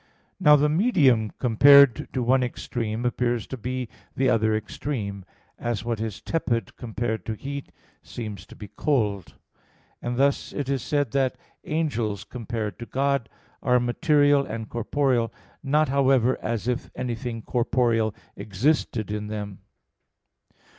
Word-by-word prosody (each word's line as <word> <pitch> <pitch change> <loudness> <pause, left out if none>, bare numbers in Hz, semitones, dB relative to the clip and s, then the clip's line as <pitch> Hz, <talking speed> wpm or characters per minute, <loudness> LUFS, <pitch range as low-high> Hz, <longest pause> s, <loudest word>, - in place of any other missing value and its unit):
Now 150 0 +7
the 150 +1 +3
medium 150 - +3
compared 140 +2 +6
to 130 - -1
one 130 +2 +3
extreme 120 -2 -3
appears 120 -1 0
to - - -6
be 125 +1 -4 0.3
the 130 -1 +2
other 110 -1 +2
extreme, 105 -3 -4 0.3
as 115 -4 -2
what 115 -2 -2
is 110 -4 -4
tepid 120 - -2
compared 115 -3 -3
to 110 - -2
heat 140 +4 -6 0.3
seems 105 -6 -7
to - - -13
be 105 - -9
cold; 105 - -1 0.7
and 120 0 -3
thus 140 +1 +1
it 140 -2 -3
is 135 -2 0
said 145 -3 0
that 135 0 +1 0.3
angels, 120 -10 -1
compared 115 -5 -5
to 120 - -7
God, 140 -3 0 0.3
are 125 -1 +3
material 145 +3 +3
and 110 -3 -5
corporeal, 120 0 0 0.3
not, 150 +2 +2
however, 130 -2 +3
as 115 0 -2
if 125 -1 -2
anything 120 -2 -4
corporeal 115 -3 +1 0.2
existed 110 +1 0
in 105 0 -3
them. 105 -2 -5
120 Hz, 135 wpm, -25 LUFS, 110-140 Hz, 0.7 s, Now